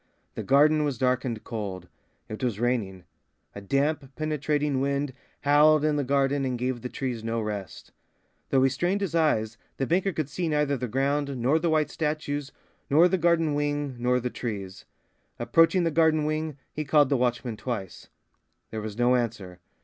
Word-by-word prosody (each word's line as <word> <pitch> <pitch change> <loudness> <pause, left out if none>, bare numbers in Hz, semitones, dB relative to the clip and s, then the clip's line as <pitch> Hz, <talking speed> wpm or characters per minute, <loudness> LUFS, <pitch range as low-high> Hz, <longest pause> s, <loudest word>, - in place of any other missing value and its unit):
The - - -5
garden 150 +3 +4
was 145 -4 -1
dark 130 0 +1
and 115 -4 -4
cold. 100 -6 -5 0.4
It 110 +4 -7
was 115 -5 -1
raining. 110 -7 -1 0.5
A 100 - -8
damp, 140 +4 -1
penetrating 150 -2 -1
wind 140 0 -1 0.3
howled 150 +1 +5
in 155 -1 +2
the 145 - 0
garden 140 +1 +1
and 130 -2 -1
gave 125 0 -2
the 125 - -5
trees 125 -4 -4
no 115 0 -1
rest. 105 -3 -6 0.6
Though 130 -1 +3
he 135 - +4
strained 175 +9 0
his 195 -4 -2
eyes, 115 -9 +1 0.2
the 135 - 0
banker 185 +6 +1
could 155 -5 -3
see 170 +4 -3
neither 150 -2 +1
the 125 -1 -3
ground, 140 +3 -1
nor 130 +7 +2
the 170 +1 0
white 155 -2 +1
statues, 150 -2 -3 0.4
nor 160 +5 +6
the 185 +1 0
garden 165 -2 +2
wing, 145 -2 -1
nor 125 +1 +2
the 125 0 -3
trees. 100 -5 -6 0.5
Approaching 165 +2 +3
the 165 - +1
garden 155 -1 +3
wing, 155 -1 -2 0.2
he 155 - -3
called 145 -1 +4
the 140 - +2
watchman 120 -1 -1
twice. 105 -6 -6 0.6
There 110 - -4
was 105 0 -6
no 120 +1 +3
answer. 105 -7 -3
140 Hz, 180 wpm, -26 LUFS, 120-150 Hz, 0.6 s, nor